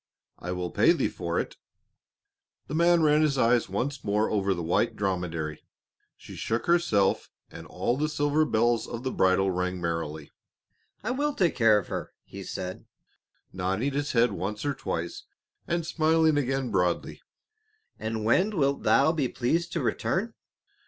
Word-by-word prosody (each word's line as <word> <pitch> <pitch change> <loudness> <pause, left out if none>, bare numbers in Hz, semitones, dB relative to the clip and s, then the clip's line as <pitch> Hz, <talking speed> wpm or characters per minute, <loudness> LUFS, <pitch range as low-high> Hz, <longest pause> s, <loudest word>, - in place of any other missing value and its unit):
I 90 - -5
will 90 -1 -3
pay - - +4
thee - - 0
for - - -3
it." - - -5 1.1
The - - -8
man 170 +1 +4
ran 150 0 +4
his 150 -3 +2
eyes 120 -2 +3
once 130 +7 -3
more 105 +1 +1
over 100 -2 +1
the 85 - -4
white 80 - +1
dromedary, 85 -6 -3 0.6
she - - -11
shook 115 +1 -2
herself 170 - +2 0.2
and - - -10
all 120 - -1
the 150 +2 0
silver 145 +1 +1
bells 120 -4 +1
of 120 +1 -6
the 130 - -2
bridle 95 +1 +2
rang 90 0 -2
merrily. 80 -3 -4 0.7
"I 220 - -1
will 290 +3 -1
take 175 -5 +2
care 115 -3 +5
of 105 - -4
her," - - -5
he - - -10
said, 90 0 -6 0.7
nodding 95 +9 -1
his 145 +1 -2
head 120 -1 +4
once 100 +5 -4
or 145 - +1
twice 85 -9 -4 0.4
and 170 -1 -1
smiling 160 -1 +3
again 135 -3 -1
broadly; 90 -3 0 0.8
"and 110 0 -3
when 190 - +2
wilt 140 -2 +1
thou 140 +3 +4
be 150 -5 0
pleased 165 +9 -1
to - - -1
return?" 215 +5 -1
120 Hz, 160 wpm, -27 LUFS, 95-155 Hz, 1.1 s, care